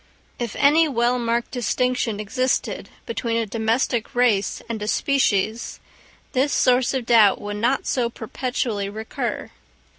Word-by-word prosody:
If 235 -3 -3
any 315 +3 +4
well 245 -2 +1
marked 235 0 -1
distinction 250 -2 -1
existed 255 +5 -1 0.2
between 230 0 -2
a 230 - 0
domestic 230 +2 -1
race 225 -6 +2
and 230 -2 -4
a 210 - -3
species, 225 -4 0 0.5
this 270 +3 +1
source 250 +1 +3
of 255 -3 -2
doubt 225 -4 +5
would 205 0 -5
not 240 +5 +1
so 245 -3 0
perpetually 225 -3 -3
recur. 220 +2 -4
235 Hz, 130 wpm, -22 LUFS, 220-255 Hz, 0.5 s, doubt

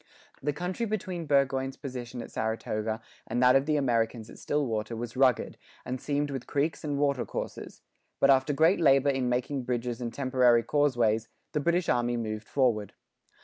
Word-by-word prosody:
The 150 - 0
country 180 +9 -3
between 185 -6 -3
Burgoyne's 135 -1 +1
position 125 -3 -6
at - - -11
Saratoga 110 0 -2 0.3
and 120 - -1
that 125 +1 +6
of 135 +1 +3
the 155 - +2
Americans 115 -4 0
at - - -13
Stillwater 115 -6 -1
was 120 +1 -6
rugged, 130 -2 +2 0.3
and 130 0 -4
seamed 145 0 -1
with 135 -3 -5
creeks 145 +3 -1
and 145 -2 -2
water 140 -3 +1
courses; - - -6 0.4
but 140 - +6
after 135 +1 +3
great 160 +6 +3
labour 140 -3 +5
in 130 -2 0
making 125 +3 -1
bridges 120 -1 -3
and 120 -1 -3
temporary 125 -3 +3
causeways, 120 -7 +1 0.2
the 150 - 0
British 170 +3 +1
army 120 0 +1
moved 110 -2 -4
forward. 115 -7 +1
130 Hz, 170 wpm, -28 LUFS, 120-145 Hz, 0.4 s, that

